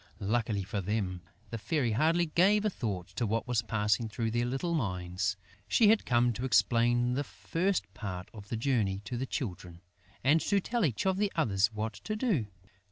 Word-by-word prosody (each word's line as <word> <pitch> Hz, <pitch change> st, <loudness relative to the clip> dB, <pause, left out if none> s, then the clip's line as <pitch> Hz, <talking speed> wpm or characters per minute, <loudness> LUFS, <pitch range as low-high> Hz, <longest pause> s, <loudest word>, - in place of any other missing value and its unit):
Luckily 105 Hz, -1 st, 0 dB
for 100 Hz, +2 st, -3 dB
them, 95 Hz, -2 st, -2 dB, 0.3 s
the 115 Hz, -, -4 dB
Fairy 130 Hz, 0 st, 0 dB
hardly 160 Hz, +9 st, +3 dB
gave 195 Hz, +6 st, +3 dB
a 210 Hz, -, +2 dB
thought 100 Hz, -, -4 dB
to 120 Hz, -, -2 dB
what 115 Hz, +4 st, -1 dB
was 120 Hz, -3 st, +1 dB
passing 110 Hz, 0 st, 0 dB
through 115 Hz, +1 st, -2 dB
their 120 Hz, +1 st, 0 dB
little 135 Hz, +7 st, -2 dB
minds. 95 Hz, -, -1 dB, 0.3 s
She 220 Hz, -3 st, +5 dB
had 220 Hz, 0 st, +3 dB
come 120 Hz, -1 st, +3 dB
to 120 Hz, -, -5 dB
explain 120 Hz, -1 st, +3 dB
the 140 Hz, +3 st, 0 dB
first 180 Hz, +6 st, -1 dB
part 95 Hz, -4 st, -6 dB
of 105 Hz, -2 st, -11 dB
the 115 Hz, -, -2 dB
journey 110 Hz, -6 st, 0 dB
to 125 Hz, -, -4 dB
the 130 Hz, +2 st, -3 dB
Children 90 Hz, -, -5 dB, 0.4 s
and 150 Hz, +5 st, +4 dB
to 200 Hz, -, +2 dB
tell 235 Hz, +4 st, -1 dB
each 130 Hz, -, -1 dB
of 190 Hz, -1 st, +2 dB
the 205 Hz, 0 st, +1 dB
others 105 Hz, -9 st, +2 dB
what 110 Hz, +1 st, -3 dB
to 215 Hz, -, -5 dB
do. 210 Hz, -, 0 dB
120 Hz, 190 wpm, -30 LUFS, 105-155 Hz, 0.4 s, She